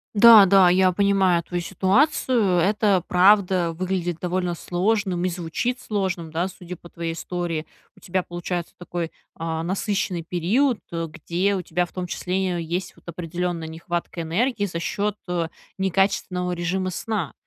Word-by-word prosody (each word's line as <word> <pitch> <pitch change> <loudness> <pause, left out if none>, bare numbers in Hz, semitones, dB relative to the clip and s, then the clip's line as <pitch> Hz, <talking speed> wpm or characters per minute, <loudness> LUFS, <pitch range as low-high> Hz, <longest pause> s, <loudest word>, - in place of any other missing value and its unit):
Да, 220 -1 +9
да, 190 -1 +6
я 185 0 +4
понимаю 190 -3 +3
твою 175 -1 -3
ситуацию, 195 - +2
это 200 0 +2
правда 185 -2 +4
выглядит 175 -1 -2
довольно 180 -1 -1
сложным, 185 0 0
и - - +1
звучит 180 +9 -3
сложным, 190 -6 -2
да, 170 +3 -1
судя 180 -2 -9
по 170 - -14
твоей 170 -1 -4
истории. 165 -1 -3 0.3
У - - -16
тебя 185 0 -2
получается 175 0 -4
такой, 175 -2 -4 0.3
а, 160 0 -3
насыщенный 190 -2 -1
период, 210 - +1
где 170 +4 -2
у 185 - -2
тебя 175 +1 -1
в - - -18
том 180 -1 -4
числе 180 -1 -2
есть, 175 +3 -4
вот, - - -23
определенная 170 0 -3
нехватка 170 +1 -4
энергии 205 +7 0
за 170 -3 -4
счет, 205 +4 -2
э, 170 -2 -1 0.3
некачественного 190 -1 0
режима 185 +2 -2
сна. 205 -4 -3
180 Hz, 150 wpm, -23 LUFS, 170-195 Hz, 0.3 s, Да